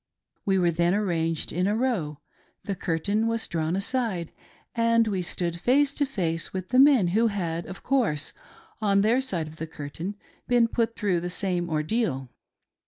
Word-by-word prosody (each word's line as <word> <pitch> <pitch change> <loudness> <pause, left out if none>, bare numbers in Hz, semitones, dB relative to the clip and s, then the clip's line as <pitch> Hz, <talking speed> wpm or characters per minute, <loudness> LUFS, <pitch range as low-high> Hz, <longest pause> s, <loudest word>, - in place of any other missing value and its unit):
We 195 -1 +2
were 175 -2 +3
then 170 +3 +2
arranged 165 -6 -1
in 180 +3 +1
a 205 - +1
row, 205 - -1 0.4
the 200 - -2
curtain 195 +5 0
was 230 0 -1
drawn 165 0 -1
aside, 195 -5 -1 0.4
and 230 -1 +3
we 195 -3 0
stood 170 -1 -3
face 275 +6 +3
to 285 -1 0
face 170 -10 -2
with 185 -1 -5
the 255 - +3
men 265 -10 +6
who 225 +6 +3
had, 170 -5 -2
of 185 - -9
course, 230 - 0 0.5
on 200 -2 +3
their 230 +5 +3
side 180 -12 -2
of 155 +1 -11
the 160 - -5
curtain 160 +7 -6 0.3
been 240 -2 +4
put 230 0 -1
through 195 -5 +1
the 175 +1 -4
same 180 -2 -1
ordeal. 155 - -1
190 Hz, 170 wpm, -26 LUFS, 170-230 Hz, 0.5 s, men